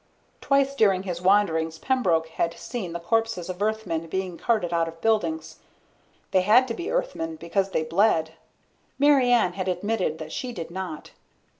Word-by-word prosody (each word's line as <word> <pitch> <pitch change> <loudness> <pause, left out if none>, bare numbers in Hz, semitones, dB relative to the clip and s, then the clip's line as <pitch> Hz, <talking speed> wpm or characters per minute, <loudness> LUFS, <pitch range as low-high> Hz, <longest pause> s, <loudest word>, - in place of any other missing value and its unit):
Twice 275 -1 +2
during 195 -8 +3
his 180 -3 -4
wanderings 165 -5 +2
Pembroke 175 -10 +1
had 165 +1 -2
seen 225 -7 -5
the 170 - -4
corpses 225 -1 -1
of 185 +1 -6
Earthmen 210 -7 -1
being 185 +1 -3
carted 205 -4 0
out 165 -1 +1
of 165 0 -9
buildings. 160 -8 -1 0.7
They 185 - +4
had 220 +7 +5
to - - -1
be 345 +9 -5
Earthmen - - -2
because 195 - -1
they 160 - 0
bled. 165 -1 +2 0.7
Mary 275 -3 +4
Ann 225 -7 +3
had 190 0 -4
admitted 185 -2 -1
that 155 -1 -8
she 250 +6 -4
did 170 -6 -7
not. 180 -4 -6
190 Hz, 165 wpm, -25 LUFS, 165-225 Hz, 0.7 s, had